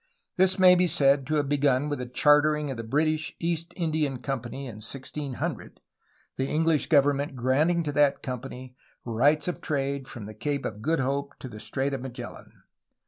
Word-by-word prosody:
This 185 0 +3
may 185 -1 +8
be 180 0 +3
said 140 -3 +3
to 155 - 0
have 145 -2 +1
begun 145 -1 +2
with 145 -2 -3
the 125 - -4
chartering 150 +2 +3
of 130 - -5
the 115 - -5
British 155 +6 0
East 170 0 -2
Indian 155 -5 0
Company 135 0 -5
in 115 -5 -8
1600, 135 +4 -5 0.6
the 130 - 0
English 160 0 +1
government 145 -2 +2
granting 150 +8 +2
to 150 - -2
that 145 -1 +2
company 125 0 -6 0.3
rights 140 +8 +2
of 180 - -3
trade 140 -2 -2
from 120 -6 -8
the 110 - -8
Cape 140 +6 -3
of 105 0 -5
Good 160 +3 +1
Hope 140 +2 -2
to - - -8
the 110 -3 -9
Strait 135 +5 -2
of 135 - -3
Magellan. 130 -1 -9
140 Hz, 180 wpm, -27 LUFS, 130-155 Hz, 0.6 s, may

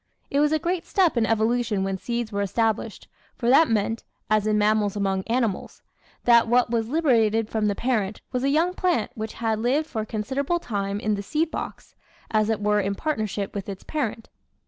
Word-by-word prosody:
It 280 - +2
was 295 0 +3
a 315 - +3
great 345 +2 -2
step 365 -7 +2
in 230 -2 +2
evolution 225 -2 +1
when 195 0 -2
seeds 235 0 -3
were 200 0 -1
established, 220 +2 -1 0.3
for 240 0 +1
that 315 +4 +6
meant 225 +1 0 0.3
as 215 -1 +3
in 215 0 +2
mammals 210 -1 +2
among 195 -2 0
animals 230 -4 -2 0.4
that 235 -1 +5
what 245 0 +3
was 225 -2 0
liberated 225 -8 +2
from 215 -1 +1
the 205 - 0
parent 215 -5 -1
was 250 0 -1
a 275 - +2
young 325 +5 +2
plant 360 - 0
which 220 0 -5
had 225 -2 -1
lived 265 +7 +1
for 225 -8 -3
a - - -4
considerable 265 +10 -1
time 200 -9 -3
in 215 0 0
the 200 - -2
seed 310 +10 -1
box, - - -6 0.4
as 215 -1 +2
it 220 -2 0
were 210 0 +2
in 200 +1 -2
partner 255 -5 -1
ship 200 0 -4
with 200 -1 -5
its 195 -1 -7
parent. 235 -7 -3
225 Hz, 205 wpm, -24 LUFS, 210-260 Hz, 0.4 s, that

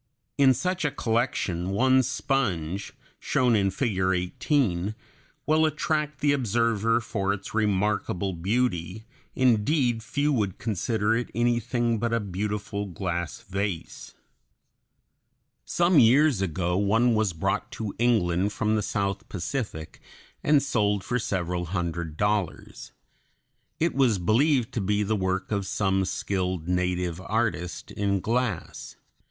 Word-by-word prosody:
In 135 -2 +5
such 185 +3 -1
a 150 - +2
collection 110 -8 -1
one 130 +6 +4
sponge, 100 - -1 0.3
shown 125 -2 +2
in 100 -2 +2
Figure 95 -4 0
18, 105 - 0 0.5
will 155 +1 +3
attract 150 -1 -1
the 145 - +3
observer 115 -3 +1
for 100 -4 -2
its 100 -1 -5
remarkable 100 -3 0
beauty; 95 +1 -1 0.3
indeed 125 0 +2
few 145 +6 0
would 105 -7 -1
consider 110 0 0
it 120 +1 -2
anything 120 0 +1
but 115 +1 -1
a - - +1
beautiful 105 +1 -3
glass 85 -1 -4
vase. 95 -10 -5 1.5
Some 175 -2 +3
years 130 0 +5
ago 90 -1 -1
one 110 +5 +3
was 110 -3 +1
brought 95 +5 -2
to 110 -5 -4
England 100 -5 +2
from 110 +1 0
the 105 - +1
South 100 +2 -2
Pacific 100 - -4 0.4
and 145 -2 +4
sold 105 -7 +1
for 125 - -1
several 90 -4 -2
hundred 85 -3 -3
dollars. 105 -3 -2 0.9
It 165 +1 +1
was 130 -6 +3
believed 120 - +2
to 115 - -1
be 105 +2 +1
the 110 +2 0
work 95 0 -2
of 100 -2 -1
some 95 -1 +1
skilled 90 -2 -2
native 90 -1 -1
artist 105 -4 -2
in 100 -1 0
glass. 115 -3 -2
105 Hz, 125 wpm, -26 LUFS, 95-120 Hz, 1.5 s, In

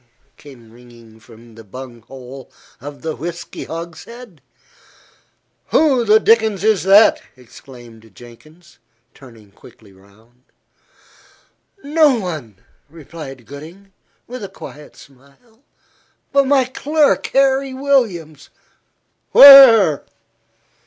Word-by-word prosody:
came 120 -6 -18
ringing 115 -2 -19
from 115 0 -19
the 115 +1 -15
bunghole 125 +3 -13 0.3
of 145 +2 -12
the 160 -1 -5
whisky 170 +1 -9
hogshead. 170 - -11 1.3
"Who 275 -6 +1
the 215 0 +4
dickens 220 -3 0
is 215 -5 +1
that?" 200 +3 +4 0.2
exclaimed 120 -3 -17
Jenkins, 155 - -19 0.3
turning 115 -6 -19
quickly 100 0 -20
round. 110 +6 -26 1.4
"No 295 -3 +1
one," 155 - -8 0.3
replied 150 -5 -13
Gooding, 170 +8 -14 0.3
with 250 -1 -10
a 200 - -8
quiet 150 0 -14
smile, 140 - -23 0.7
"but 275 -1 +1
my 270 -2 +1
clerk, 295 +3 -1
Harry 270 0 0
Williams." 205 - -3 0.8
"Where?" 235 - +7
155 Hz, 95 wpm, -16 LUFS, -, 1.4 s, Where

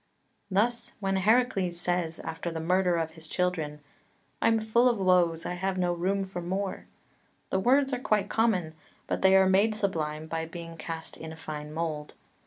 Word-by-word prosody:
3 190 - -5
Thus 235 +4 +1
when 195 -1 0
Heracles 195 -4 +2
says, 175 -2 -1
after 165 +2 -4
the 165 -1 -4
murder 180 +2 +2
of 165 -1 -1
his 160 -1 -11
children, 160 -5 -1 0.6
"I'm 225 - +4
full 225 +3 +3
of 235 -4 0
woes, 180 -3 +3
I - - -2
have 190 +1 -2
no 180 -1 +1
room 190 +3 0
for 190 -2 -5
more," 190 +3 -3 0.6
the 190 - +2
words 270 +6 +3
are 250 - 0
quite 210 -5 +1
common, 205 -8 +1 0.3
but - - -2
they 190 0 +6
are 190 0 +6
made 200 +3 +3
sublime 160 -7 -2
by 160 0 -3
being 165 0 -8
cast 160 0 -6
in 160 0 -7
a 160 - -9
fine 150 -1 -6
mould. 155 -2 -4
180 Hz, 185 wpm, -28 LUFS, 165-200 Hz, 0.6 s, they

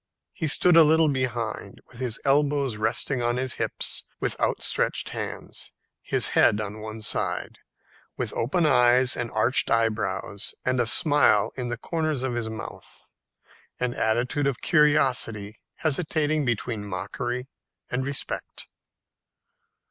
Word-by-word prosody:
He 160 - -2
stood 175 +4 +4
a 165 - +9
little 160 0 +4
behind, 120 -6 -3
with 120 -1 -3
elbows 140 -2 +2
resting 120 +4 0
on 120 +1 0
his 130 0 -1
hips, - - -2 0.2
with - - -1
outstretched - - 0
hands, - - -6 0.4
the - - +1
head 105 - +4
on 105 0 -5
one 110 +1 -7
side, - - -2 0.6
with - - -3
open 150 +9 0
eyes 125 -2 +4
and 120 -1 -3
arched 110 +4 +1
eyebrows, 110 -2 -1
and 130 0 +1
a 120 - +2
smile 120 - +4
in 125 -2 -4
the 120 0 -3
corners 155 -1 -2
of 130 -2 -1
his 120 -2 -3
mouth 110 0 -9 0.7
an 125 -1 -1
attitude 125 +6 0
of 135 -4 -2
curiosity 125 -9 +2 0.2
hesitating 155 -1 0
between 115 -2 -2
mockery 120 +6 -4 0.4
and 125 +1 -1
respect. 140 +1 -5
125 Hz, 130 wpm, -25 LUFS, 110-140 Hz, 0.7 s, a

